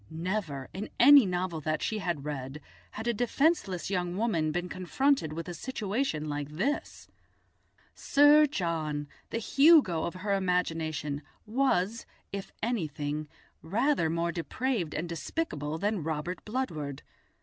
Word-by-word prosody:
Never, 165 Hz, -5 st, -3 dB
in 200 Hz, +3 st, -5 dB
any 275 Hz, -2 st, +9 dB
novel 180 Hz, -3 st, -2 dB
that 155 Hz, +1 st, -1 dB
she 220 Hz, -, -1 dB
had 170 Hz, -7 st, -3 dB
read, 140 Hz, -1 st, -5 dB, 0.3 s
had 220 Hz, -, -6 dB
a 235 Hz, -, +2 dB
defenceless 240 Hz, -, +1 dB
young 180 Hz, -1 st, -1 dB
woman 170 Hz, -9 st, +1 dB
been 175 Hz, +2 st, -2 dB
confronted 185 Hz, -, +1 dB
with 165 Hz, +2 st, -5 dB
a 175 Hz, -, -4 dB
situation 205 Hz, -, -2 dB
like 145 Hz, -1 st, -3 dB
this. 195 Hz, -, -3 dB, 0.9 s
Sir 290 Hz, +1 st, +5 dB
John, 160 Hz, -, -2 dB, 0.2 s
the -, -, -2 dB
Hugo 275 Hz, -, +5 dB
of 170 Hz, -, -4 dB
her 200 Hz, +2 st, -1 dB
imagination, 165 Hz, -6 st, -1 dB, 0.2 s
was, 230 Hz, -3 st, 0 dB, 0.2 s
if 200 Hz, -1 st, -5 dB
anything, 155 Hz, -, -2 dB, 0.3 s
rather 215 Hz, -, +1 dB
more 170 Hz, +1 st, 0 dB
depraved 185 Hz, -, -2 dB
and 165 Hz, +3 st, -2 dB
despicable 160 Hz, -, -3 dB
than 205 Hz, +1 st, -1 dB
Robert 160 Hz, +3 st, -3 dB
Bludward. 160 Hz, -, -3 dB
180 Hz, 130 wpm, -29 LUFS, 155-230 Hz, 0.9 s, any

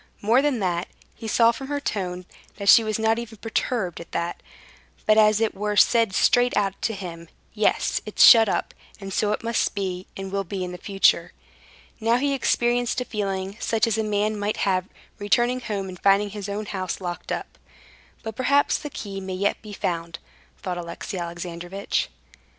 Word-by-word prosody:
More 230 Hz, +5 st, +3 dB
than 285 Hz, -3 st, +1 dB
that, 175 Hz, -2 st, -1 dB, 0.3 s
he 225 Hz, -, -8 dB
saw 230 Hz, +1 st, +4 dB
from 265 Hz, +3 st, -7 dB
her 290 Hz, 0 st, -2 dB
tone 180 Hz, -8 st, -3 dB, 0.3 s
that 200 Hz, -1 st, -1 dB
she 230 Hz, -, +8 dB
was 215 Hz, -1 st, -1 dB
not 220 Hz, +1 st, +2 dB
even 230 Hz, -2 st, -8 dB
perturbed 220 Hz, -, -2 dB
at 170 Hz, -, -13 dB
that, 170 Hz, +1 st, -3 dB, 0.6 s
but 215 Hz, -, +5 dB
as 215 Hz, -1 st, +5 dB
it 225 Hz, -1 st, +1 dB
were 210 Hz, +1 st, -2 dB
said 225 Hz, -2 st, +4 dB
straight 245 Hz, 0 st, +3 dB
out 200 Hz, -2 st, +1 dB
to 225 Hz, -, -1 dB
him: 170 Hz, -3 st, -8 dB, 0.2 s
"Yes, -, -, +1 dB
it's -, -, +2 dB
shut 225 Hz, -3 st, +9 dB
up, -, -, -1 dB, 0.3 s
and 195 Hz, -1 st, -7 dB
so 210 Hz, +2 st, +1 dB
it 210 Hz, -, -2 dB
must 230 Hz, -2 st, 0 dB
be, 185 Hz, -2 st, -3 dB
and 195 Hz, 0 st, -6 dB
will 200 Hz, 0 st, -1 dB
be 190 Hz, 0 st, -4 dB
in 180 Hz, 0 st, -5 dB
future." 195 Hz, +1 st, +2 dB, 0.7 s
Now 230 Hz, +1 st, +2 dB
he 280 Hz, +2 st, 0 dB
experienced 245 Hz, -2 st, +1 dB
a 250 Hz, -, -3 dB
feeling 195 Hz, -3 st, -3 dB
such 225 Hz, -2 st, +1 dB
as 225 Hz, -2 st, 0 dB
a -, -, +1 dB
man 210 Hz, 0 st, 0 dB
might 205 Hz, +1 st, -1 dB
have, 185 Hz, -1 st, 0 dB, 0.3 s
returning 240 Hz, +5 st, +2 dB
home 205 Hz, -5 st, -4 dB
and 185 Hz, -1 st, -9 dB
finding 200 Hz, +1 st, +3 dB
his 205 Hz, -1 st, -6 dB
own 210 Hz, +1 st, -3 dB
house 185 Hz, -3 st, -4 dB
locked 175 Hz, -2 st, -5 dB
up. -, -, -5 dB, 0.6 s
"But 220 Hz, -2 st, -6 dB
perhaps 280 Hz, +4 st, +2 dB
the 295 Hz, -, -6 dB
key 195 Hz, -7 st, -6 dB
may 190 Hz, -1 st, -5 dB
yet 200 Hz, +2 st, 0 dB
be 215 Hz, -, -10 dB
found," 170 Hz, -4 st, -3 dB, 0.5 s
thought 180 Hz, -2 st, -3 dB
Alexey 175 Hz, +3 st, -6 dB
Alexandrovitch. 175 Hz, +2 st, -3 dB
205 Hz, 185 wpm, -24 LUFS, 185-225 Hz, 0.7 s, shut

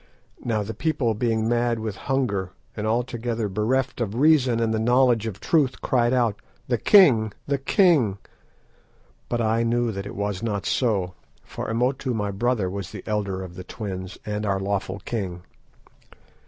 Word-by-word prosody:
"Now 110 Hz, -3 st, 0 dB
the 110 Hz, +2 st, -5 dB
people 140 Hz, -7 st, 0 dB
being 110 Hz, 0 st, 0 dB
mad 120 Hz, 0 st, +1 dB
with 110 Hz, -2 st, -4 dB
hunger, 100 Hz, -9 st, -1 dB, 0.2 s
and 105 Hz, 0 st, -3 dB
altogether 115 Hz, -1 st, -1 dB
bereft 120 Hz, +6 st, -1 dB
of 110 Hz, -2 st, -2 dB
reason 130 Hz, -4 st, +4 dB
and 115 Hz, -1 st, +1 dB
the 110 Hz, -, 0 dB
knowledge 120 Hz, -1 st, +3 dB
of 100 Hz, -3 st, -6 dB
truth, 140 Hz, -3 st, +1 dB
cried 120 Hz, -2 st, +2 dB
out—'The 120 Hz, 0 st, -1 dB
king! 115 Hz, -, +6 dB
The 140 Hz, -1 st, 0 dB
king!' 135 Hz, -, +3 dB, 1.1 s
but 120 Hz, -1 st, 0 dB
I 115 Hz, +1 st, +2 dB
knew 120 Hz, 0 st, +1 dB
that 100 Hz, -1 st, -5 dB
it -, -, -8 dB
was 100 Hz, -1 st, -2 dB
not 105 Hz, -3 st, -2 dB
so, 100 Hz, -8 st, 0 dB, 0.3 s
for -, -, -6 dB
Imotu 125 Hz, +2 st, 0 dB
my 105 Hz, -2 st, -1 dB
brother 110 Hz, 0 st, 0 dB
was 95 Hz, -1 st, -5 dB
the 100 Hz, -2 st, -9 dB
elder 100 Hz, -3 st, -2 dB
of 90 Hz, -2 st, -9 dB
the 90 Hz, 0 st, -8 dB
twins, 95 Hz, -1 st, -6 dB
and 105 Hz, 0 st, -3 dB
our 100 Hz, -2 st, 0 dB
lawful 95 Hz, -1 st, -2 dB
king. 95 Hz, -6 st, -4 dB
110 Hz, 160 wpm, -24 LUFS, 100-125 Hz, 1.1 s, king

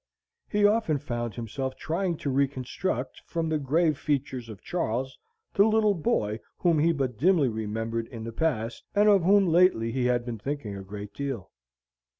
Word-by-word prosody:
He 205 Hz, -1 st, +3 dB
often 205 Hz, -7 st, +3 dB
found 120 Hz, -5 st, -4 dB
himself 130 Hz, +3 st, -4 dB
trying 170 Hz, +3 st, -1 dB
to 140 Hz, -, +1 dB
reconstruct, 130 Hz, +1 st, -1 dB
from 165 Hz, -1 st, -2 dB
the 155 Hz, -1 st, +1 dB
grave 155 Hz, +2 st, +1 dB
features 135 Hz, -5 st, -2 dB
of 105 Hz, -3 st, -10 dB
Charles, 130 Hz, -6 st, -2 dB, 0.4 s
the 200 Hz, -, +5 dB
little 215 Hz, -1 st, +3 dB
boy 110 Hz, -, 0 dB, 0.2 s
whom 170 Hz, -4 st, +2 dB
he 165 Hz, +3 st, +4 dB
but 130 Hz, -7 st, -2 dB
dimly 165 Hz, -4 st, +4 dB
remembered 110 Hz, +1 st, -3 dB
in 115 Hz, -3 st, -8 dB
the 115 Hz, 0 st, -6 dB
past, 120 Hz, -6 st, -1 dB
and 205 Hz, +1 st, +5 dB
of 200 Hz, -2 st, +6 dB
whom 195 Hz, +3 st, +5 dB
lately 170 Hz, -10 st, +4 dB
he 125 Hz, +1 st, 0 dB
had 120 Hz, -1 st, +1 dB
been 120 Hz, -3 st, -5 dB
thinking 135 Hz, -4 st, -4 dB
a 100 Hz, -, -6 dB
great 100 Hz, +1 st, -8 dB
deal. 135 Hz, -9 st, -4 dB
135 Hz, 170 wpm, -27 LUFS, 115-170 Hz, 0.4 s, of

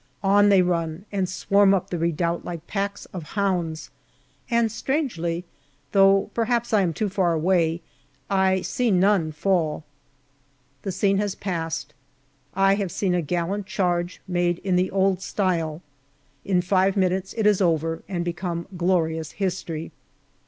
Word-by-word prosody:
On 205 Hz, +1 st, +5 dB
they 195 Hz, -2 st, +5 dB
run, 170 Hz, 0 st, -2 dB
and 190 Hz, -3 st, -1 dB
swarm 200 Hz, +1 st, +3 dB
up 185 Hz, -, -3 dB
the 175 Hz, -, -1 dB
redoubt 170 Hz, +1 st, 0 dB
like 170 Hz, -2 st, -6 dB
packs 200 Hz, +1 st, -3 dB
of 180 Hz, -, -4 dB, 0.2 s
hounds, 175 Hz, -5 st, -1 dB, 0.6 s
and 235 Hz, -2 st, +2 dB
strangely 215 Hz, -, -2 dB, 0.5 s
though 195 Hz, 0 st, +4 dB
perhaps 235 Hz, 0 st, 0 dB
I 210 Hz, -, +5 dB
am 180 Hz, -3 st, +1 dB
too 210 Hz, +7 st, -1 dB
far 185 Hz, -3 st, +1 dB
away 165 Hz, 0 st, +1 dB, 0.5 s
I 190 Hz, -1 st, +2 dB
see 245 Hz, -2 st, -1 dB
none 190 Hz, -4 st, +3 dB
fall. 155 Hz, -1 st, 0 dB, 1.0 s
The 195 Hz, -, -3 dB
scene 195 Hz, +1 st, +1 dB
has 205 Hz, -1 st, -1 dB
passed: 165 Hz, -6 st, -4 dB, 0.6 s
I 195 Hz, 0 st, +4 dB
have 200 Hz, -3 st, -1 dB
seen 190 Hz, -3 st, 0 dB
a 175 Hz, -, +1 dB
gallant 175 Hz, +5 st, -2 dB
charge, 175 Hz, -3 st, -1 dB
made 175 Hz, -1 st, +1 dB
in 185 Hz, -2 st, +1 dB
the 180 Hz, +1 st, +2 dB
old 190 Hz, -1 st, +1 dB
style. 170 Hz, -5 st, -1 dB, 0.6 s
In 180 Hz, -2 st, +1 dB
five 190 Hz, +2 st, +2 dB
minutes 190 Hz, 0 st, 0 dB
it 220 Hz, -2 st, -1 dB
is 210 Hz, -2 st, +4 dB
over 165 Hz, -2 st, +1 dB
and 175 Hz, -3 st, -2 dB
become 175 Hz, -1 st, -3 dB
glorious 165 Hz, -3 st, 0 dB
history. 175 Hz, -4 st, -3 dB
185 Hz, 145 wpm, -24 LUFS, 170-195 Hz, 1.0 s, On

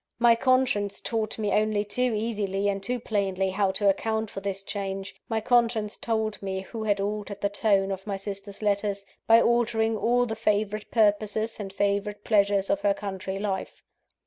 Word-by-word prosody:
My 240 Hz, 0 st, +6 dB
conscience 230 Hz, -5 st, +1 dB
taught 220 Hz, -2 st, -2 dB
me 210 Hz, -2 st, -1 dB
only 210 Hz, 0 st, +1 dB
too 250 Hz, +5 st, 0 dB
easily 205 Hz, -3 st, -1 dB
and 195 Hz, -1 st, -2 dB
too 245 Hz, +5 st, -1 dB
plainly 195 Hz, -4 st, -1 dB
how 195 Hz, 0 st, +1 dB
to 200 Hz, +1 st, +1 dB
account 220 Hz, +2 st, 0 dB
for -, -, -5 dB
this 195 Hz, 0 st, -4 dB
change 195 Hz, -1 st, -4 dB, 0.2 s
my 225 Hz, -1 st, +1 dB
conscience 230 Hz, -3 st, +2 dB
told 220 Hz, -2 st, -1 dB
me 190 Hz, -1 st, -3 dB
who 220 Hz, +3 st, -6 dB
had 205 Hz, -1 st, +1 dB
altered 205 Hz, 0 st, -3 dB
the 200 Hz, -, +1 dB
tone 200 Hz, -1 st, +2 dB
of 195 Hz, +1 st, -5 dB
my 200 Hz, -1 st, -2 dB
sister's 200 Hz, +1 st, -7 dB
letters, 200 Hz, -1 st, 0 dB, 0.2 s
by 225 Hz, 0 st, +8 dB
altering 230 Hz, -1 st, +2 dB
all 240 Hz, +4 st, +2 dB
the 220 Hz, -2 st, -3 dB
favourite 210 Hz, -1 st, 0 dB
purposes 215 Hz, 0 st, +1 dB
and 195 Hz, -2 st, -5 dB
favourite 205 Hz, +1 st, -1 dB
pleasures 200 Hz, -2 st, +2 dB
of 295 Hz, 0 st, 0 dB
her 300 Hz, -1 st, +2 dB
country 195 Hz, -4 st, -5 dB
life. 195 Hz, -1 st, -4 dB
205 Hz, 175 wpm, -26 LUFS, 195-225 Hz, 0.2 s, by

